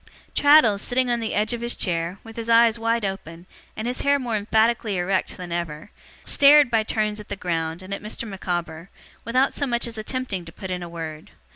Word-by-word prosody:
Traddles, 285 -9 +5
sitting 250 +1 0
on 240 - +1
the 225 -1 -3
edge 215 +3 +1
of 235 - -4
his 235 0 -1
chair, 170 0 -2
with 225 -1 -12
his 230 0 -5
eyes 230 0 +5
wide 230 -1 0
open, 175 -3 -6 0.3
and 215 +2 -3
his 250 +1 -2
hair 285 0 +3
more 245 -5 -2
emphatically 220 0 +1
erect 185 +2 -1
than 180 -1 -8
ever, 170 +1 -4 0.3
stared 285 -2 +6
by 225 -1 +3
turns 215 -1 -1
at 210 - -11
the 200 - -3
ground 165 -2 -3
and 190 +1 -6
at - - -5
Mr. 215 +2 -5
Micawber, 175 -3 -4 0.4
without 255 +4 +2
so 285 - -2
much 240 -1 0
as 230 -2 -6
attempting 215 -5 -3
to 165 - -11
put 190 +1 -8
in 180 -1 -3
a 175 - -7
word. 160 -2 -7
215 Hz, 215 wpm, -23 LUFS, 180-235 Hz, 0.4 s, stared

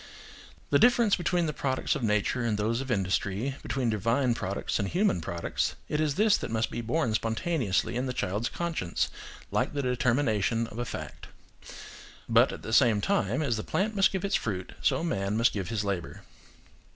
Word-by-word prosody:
The - - +5
difference 240 -4 +5
between 175 -1 0
the 155 - -2
products 130 -2 -1
of 150 - -3
nature 105 +2 +1
and 115 -3 0
those 115 +4 0
of 135 - -6
industry, 100 +4 -1
between 125 -4 -1
divine 115 +4 +1
products 100 -2 -2
and 100 - 0
human 180 - +1
products–it 85 - -2
is 150 -3 0
this 215 0 +4
that - - -5
must 110 0 -1
be - - -3
born 120 +1 0
spontaneously 115 - 0
in 125 +2 -1
the - - -1
child's 105 -1 -2
conscience, 165 - -2 0.4
like - - 0
the 140 - -1
determination 115 -4 +1
of 115 +1 -9
a 120 - -1
fact. - - -7 1.0
But - - +5
at - - -8
the 110 - -4
same 115 -4 +5
time, 195 - 0
as 120 -6 0
the 110 - -3
plant 215 +3 -1
must 195 -1 +4
give 190 0 -2
its 200 - -2
fruit, 95 -4 -1
so - - +1
man 100 -9 -1
must 115 +1 +3
give 95 -3 -3
his 110 -3 -1
labour. 100 -4 -4
120 Hz, 185 wpm, -28 LUFS, 105-150 Hz, 1.0 s, The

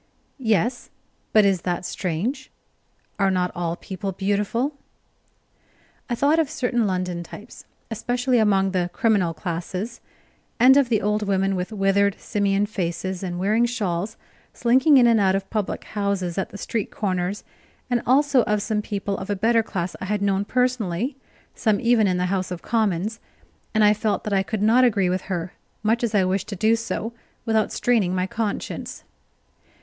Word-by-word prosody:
"Yes; 235 +1 0 0.4
but 215 -1 +5
is 190 -3 +2
that 180 0 -2
strange 190 - -3 0.7
are 195 0 +3
not 180 -1 0
all 170 -1 -2
people 195 +1 -5
beautiful?" 205 +8 -1 1.4
I 240 - 0
thought 290 +6 +3
of 315 -4 +1
certain 245 -6 0
London 180 -2 -2
types, 205 +7 -11 0.3
especially 245 +2 0
among 195 -3 +3
the 180 -2 0
"criminal 195 -7 +1
classes," 185 +7 -4 0.6
and 255 +3 +7
of 275 -3 +4
the 220 -5 +1
old 210 0 0
women 195 0 +1
with 180 +3 -3
withered, 200 -1 +2
simian 200 0 0
faces 185 -2 -3
and 180 -2 -4
wearing 215 +6 +2
shawls, 210 -3 -2 0.4
slinking 260 +5 +4
in 245 -2 +6
or 230 -2 +4
out 190 -1 +3
of 195 0 -2
public 215 -3 -2
houses 200 -4 -2
at 190 - -2
the - - -9
street 215 0 -3
corners; 185 -1 -2 0.4
and 245 -2 0
also 275 +1 +4
of 210 -1 0
some 215 -1 -1
people 200 -1 -3
of 190 - -7
a 205 - +1
better 225 +4 +3
class 185 -5 -4
I - - -3
had 205 +1 -1
known 200 0 +1
personally 250 - 0 0.4
some 215 -3 +1
even 230 -3 +3
in 180 -1 +1
the 180 - 0
House 185 -1 -1
of 180 -2 -6
Commons; 215 -1 0 0.6
and 215 - +4
I 210 0 +6
felt 215 0 -1
that 210 - -3
I 195 - +3
could 205 +1 -3
not 235 +4 +5
agree 200 -7 +3
with 185 0 -1
her, 175 -1 -3 0.3
much 225 +3 +1
as 225 -2 0
I 195 - +4
wished 190 +1 -1
to 205 - -5
do 220 +4 +3
so, 230 0 -4 0.3
without 220 -2 +1
straining 215 -7 +1
my 185 0 +1
conscience. 210 +1 -4
205 Hz, 170 wpm, -23 LUFS, 190-230 Hz, 1.4 s, and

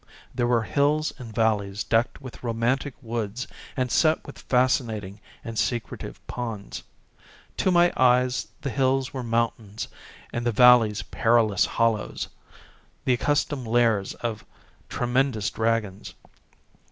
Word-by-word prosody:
There 120 - 0
were 120 -2 +2
hills 150 +5 +1
and 120 -3 -8
valleys 105 -3 0
decked 115 +1 +1
with 130 -3 -10
romantic 120 +4 -1
woods 115 0 -3 0.3
and 125 -2 0
set 155 -1 +3
with 140 - -10
fascinating 115 -6 0 0.2
and 115 -1 -4
secretive 120 -6 -3
ponds. 115 -5 -5 0.8
To - - +2
my 175 -1 +4
eyes 125 0 +3
the 140 - -3
hills 130 0 +1
were 130 - -3
mountains 115 -2 -2 0.5
and 120 - -2
the 120 - +1
valleys 115 -3 +6
perilous 115 -4 +2
hollows, 115 -2 0 0.8
the 130 - +3
accustomed 135 +1 0
lairs 115 -4 +2
of 115 -3 -4 0.5
tremendous 120 -3 0
dragons. 110 -3 -2
120 Hz, 120 wpm, -25 LUFS, 110-130 Hz, 0.8 s, valleys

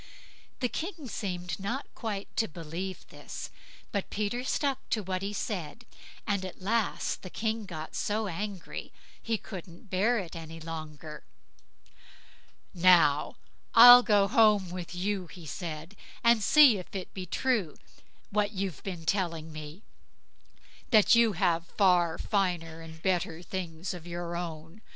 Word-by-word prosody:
The 250 - +2
King 325 +1 -5
seemed 180 -5 -4
not 235 +8 -3
quite 205 -4 -5
to 225 - +2
believe 170 +4 -6
this, - - -8 0.4
but 200 -2 -2
Peter 215 +4 -2
stuck 275 0 -1
to 215 - 0
what 185 0 -2
he 200 +1 -3
said, 200 0 -4 0.4
and 200 -3 0
at 185 - -7
last 215 +3 -1
the 185 - -8
King 220 +1 -2
got 160 -4 -7
so 215 +1 -1
angry, 195 0 -5 0.3
he 225 -1 -1
couldn't 185 -1 -10
bear 210 +6 +2
it 180 -5 -5
any 165 0 -8
longer. 155 -2 -8 1.5
"Now 170 -5 +4 0.4
I'll 245 +1 +12
go 205 -4 +3
home 210 -4 +4
with 180 -1 -6
you", 190 0 -2
he 175 -1 -12
said, 160 +3 -6 0.3
"and 235 -1 +5
see 260 -2 +7
if 180 - -11
it 190 - -5
be 185 -1 -6
true 215 - 0 0.5
what 210 +1 +1
you've 190 -6 -3
been 175 -4 -6
telling 165 -4 -1
me, 155 +6 -9 1.1
that 215 -4 +6
you 230 -2 +5
have 165 -1 +1
far 175 -4 +4
finer 175 -5 -1
and 160 0 -11
better 175 -3 0
things 175 -1 -5
of 175 -1 -9
your 175 0 -4
own. 165 +2 -6
185 Hz, 140 wpm, -29 LUFS, 165-210 Hz, 1.5 s, I'll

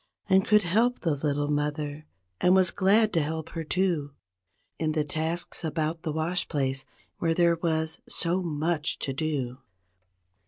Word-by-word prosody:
And 190 -1 +4
could 210 -1 +5
help 225 +8 +2
the 165 - +1
little 145 0 -1
mother 150 0 -2 0.3
and 180 +1 +5
was 185 -2 +4
glad 205 +2 +3
to 165 - +3
help 160 +1 -3
her, 165 - -4
too. 160 -5 0 0.6
In 155 -1 0
the 155 -1 +1
tasks 160 +4 -2
about 160 0 -1
the 160 - -3
wash 160 +4 -1
place 135 -3 -1 0.3
where 165 -1 +1
there 170 -1 +4
was 160 -1 0
so 175 +2 0
much 160 -1 -1
to 135 - -3
do. 135 -4 -2
160 Hz, 155 wpm, -27 LUFS, 150-175 Hz, 0.6 s, could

